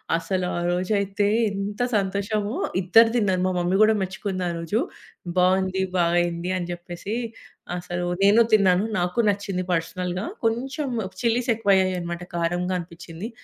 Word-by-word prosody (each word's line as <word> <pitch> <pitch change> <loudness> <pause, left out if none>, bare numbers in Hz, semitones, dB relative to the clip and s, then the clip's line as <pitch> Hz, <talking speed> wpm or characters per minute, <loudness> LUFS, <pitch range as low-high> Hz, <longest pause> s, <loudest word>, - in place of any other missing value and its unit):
అసలు 180 +2 -1
ఆరోజు 175 +2 -1
అయితే 200 +1 0 0.2
ఎంత 200 +1 -4 0.2
సంతోషమో! 200 +2 -1 0.3
ఇద్దరూ 225 +6 +6
తిన్నారు. 190 -6 +2
మా - - +1
మమ్మీ 175 +2 +1
కూడా 220 +1 +5
మెచ్చుకుంది 190 0 -3
ఆరోజు. 170 +5 -1 0.6
బాగుంది, 190 +1 +2
బా 175 - +3 0.2
అయింది 175 +1 -1
అని 175 -1 -4
చెప్పేసి. 175 +4 -6 0.6
అసలు 175 0 -4 0.2
నేను 210 +4 +6
తిన్నాను. 190 -3 +5 0.2
నాకు 180 +6 -1
నచ్చింది. 195 -2 -3
పర్సనల్‌గా 180 +3 -2 0.2
కొంచెం 265 +6 -1 0.4
చిల్లీస్ 235 +2 +1
ఎక్కువ 210 -2 +1
అయ్యాయన్నమాట. 180 -2 -1
కారంగా 175 +2 0
అనిపించింది. 170 +3 -8
185 Hz, 130 wpm, -24 LUFS, 175-205 Hz, 0.6 s, ఇద్దరూ